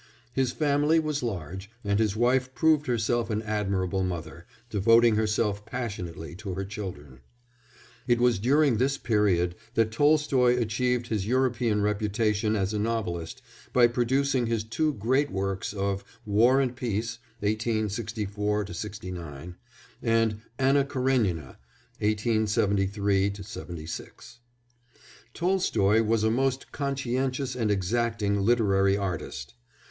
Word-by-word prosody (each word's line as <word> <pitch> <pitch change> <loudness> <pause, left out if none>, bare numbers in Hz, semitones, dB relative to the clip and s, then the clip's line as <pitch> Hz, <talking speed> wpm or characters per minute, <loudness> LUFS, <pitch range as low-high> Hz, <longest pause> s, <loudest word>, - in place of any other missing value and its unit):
His 130 -2 +1
family 150 +1 +2
was 150 -2 -1
large, 95 -3 -5
and 100 0 +1
his 105 -2 +1
wife 130 +2 +1
proved 150 +2 +3
herself 120 0 0
an 110 0 -1
admirable 95 -3 -1
mother, 85 -2 -5 0.2
devoting 115 +1 +4
herself 105 -1 0
passionately 90 - -5
to 100 -3 -5
her 95 +1 -3
children. 90 -10 -7 0.9
It 120 -1 +3
was 120 -4 +3
during 135 +2 +3
this 135 +4 +1
period 95 -6 +1 0.2
that 110 -1 +2
Tolstoy 135 -2 +3
achieved 120 +2 0
his 105 -3 -1
European 120 -4 +1
reputation 105 +1 0
as 100 0 -1
a 105 - -1
novelist 105 -7 -3 0.3
by 125 -1 +6
producing 125 +1 +1
his 115 -2 0
two 150 +7 -1
great 130 +7 +1
works 95 0 -2
of 100 -1 -2 0.2
War 115 +6 +4
and 130 -2 0
Peace, 115 -1 -3 0.2
1864 105 -1 -1 0.4
9, 85 -2 -7 0.5
and 115 -2 +1 0.2
Anna 135 +1 +3
Karénina, 125 - 0 0.4
1873 105 -2 +1 0.5
6. 110 +7 -9 1.0
Tolstoy 115 - +2
was 110 0 +1
a 110 - +3
most 135 +2 0
conscientious 135 -1 -2
and 115 -4 0
exacting 105 +1 0
literary 100 -3 +3
artist. 80 -8 -4
110 Hz, 115 wpm, -27 LUFS, 100-125 Hz, 1.0 s, by